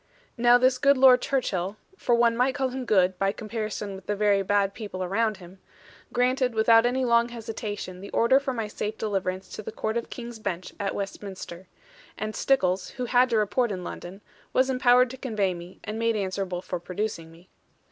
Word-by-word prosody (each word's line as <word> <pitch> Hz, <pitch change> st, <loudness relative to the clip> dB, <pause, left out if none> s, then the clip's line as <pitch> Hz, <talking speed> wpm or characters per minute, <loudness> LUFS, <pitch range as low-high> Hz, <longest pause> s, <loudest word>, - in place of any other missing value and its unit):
Now 240 Hz, 0 st, +6 dB
this 255 Hz, 0 st, +3 dB
good 280 Hz, +1 st, +4 dB
Lord 255 Hz, -1 st, +7 dB
Churchill 200 Hz, -7 st, -1 dB, 0.2 s
for 245 Hz, -10 st, +1 dB
one 235 Hz, -1 st, +3 dB
might 255 Hz, +3 st, +1 dB
call 265 Hz, -2 st, 0 dB
him 255 Hz, 0 st, -5 dB
good, 190 Hz, -4 st, +2 dB
by 195 Hz, 0 st, +2 dB
comparison 215 Hz, -2 st, -5 dB
with 190 Hz, -1 st, -11 dB
the 210 Hz, -, 0 dB
very 205 Hz, -1 st, +3 dB
bad 200 Hz, 0 st, +1 dB
people 200 Hz, -4 st, -5 dB
around 215 Hz, +3 st, 0 dB
him 185 Hz, 0 st, -14 dB, 0.5 s
granted 250 Hz, 0 st, +1 dB
without 225 Hz, +1 st, +5 dB
any 255 Hz, +1 st, 0 dB
long 235 Hz, 0 st, +3 dB
hesitation 215 Hz, -5 st, -6 dB
the 200 Hz, -, -8 dB
order 260 Hz, +4 st, +4 dB
for 275 Hz, -1 st, -3 dB
my 225 Hz, -4 st, -3 dB
safe 210 Hz, 0 st, -4 dB
deliverance 190 Hz, -3 st, -2 dB
to -, -, -7 dB
the -, -, -7 dB
Court 220 Hz, +1 st, -2 dB
of 235 Hz, -, -4 dB
King's 235 Hz, -2 st, -8 dB
Bench 180 Hz, -4 st, -4 dB
at 200 Hz, -, -2 dB
Westminster; 190 Hz, -2 st, -7 dB, 0.5 s
and 215 Hz, 0 st, -4 dB
Stickles, 185 Hz, -9 st, +1 dB
who 250 Hz, -, -2 dB
had 250 Hz, +1 st, +3 dB
to 230 Hz, -, +2 dB
report 215 Hz, +3 st, +1 dB
in 185 Hz, -2 st, -4 dB
London, 180 Hz, +3 st, -8 dB, 0.3 s
was 260 Hz, +1 st, +3 dB
empowered 250 Hz, -1 st, +4 dB
to 260 Hz, -, -8 dB
convey 215 Hz, -8 st, -1 dB
me, 175 Hz, +1 st, -11 dB
and 215 Hz, +1 st, -5 dB
made 230 Hz, 0 st, +1 dB
answerable 190 Hz, -2 st, -3 dB
for 180 Hz, -, -4 dB
producing 175 Hz, -2 st, -4 dB
me. 170 Hz, +3 st, -19 dB
215 Hz, 195 wpm, -26 LUFS, 190-245 Hz, 0.5 s, Lord